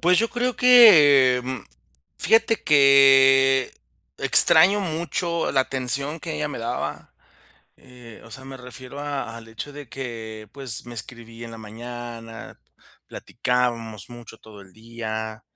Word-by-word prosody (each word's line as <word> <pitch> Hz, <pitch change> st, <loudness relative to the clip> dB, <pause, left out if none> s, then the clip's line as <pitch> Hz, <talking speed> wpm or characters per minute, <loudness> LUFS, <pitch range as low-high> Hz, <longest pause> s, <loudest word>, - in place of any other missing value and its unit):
Pues 180 Hz, +2 st, +2 dB
yo 230 Hz, -, +1 dB
creo 245 Hz, +1 st, -2 dB
que, 150 Hz, -, +6 dB
mm, 130 Hz, 0 st, -5 dB, 0.6 s
fíjate 225 Hz, 0 st, +1 dB
que 135 Hz, -2 st, +4 dB, 0.5 s
extraño 190 Hz, +6 st, +4 dB
mucho 170 Hz, -1 st, -3 dB
la 135 Hz, -, +2 dB
atención 135 Hz, +4 st, -4 dB
que -, -, -6 dB
ella -, -, -3 dB
me -, -, -7 dB
daba, -, -, -6 dB, 0.6 s
eh, 125 Hz, -3 st, -15 dB
o 115 Hz, -, -15 dB
sea, 130 Hz, +2 st, -11 dB
me 135 Hz, 0 st, -10 dB
refiero 125 Hz, +2 st, -11 dB
a 140 Hz, -5 st, -5 dB
al 115 Hz, -1 st, -12 dB
hecho 115 Hz, +6 st, -9 dB
de 145 Hz, -2 st, -11 dB
que, 110 Hz, -4 st, -8 dB
pues 130 Hz, -5 st, -8 dB
me 120 Hz, -, -10 dB
escribía 115 Hz, +1 st, -10 dB
en -, -, -11 dB
la 115 Hz, -, -10 dB
mañana, 115 Hz, +1 st, -10 dB, 0.5 s
platicábamos 115 Hz, -4 st, -3 dB
mucho 120 Hz, -2 st, -13 dB
todo 105 Hz, -2 st, -15 dB
el 95 Hz, -1 st, -18 dB
día 110 Hz, 0 st, -7 dB
125 Hz, 140 wpm, -22 LUFS, 115-145 Hz, 0.6 s, que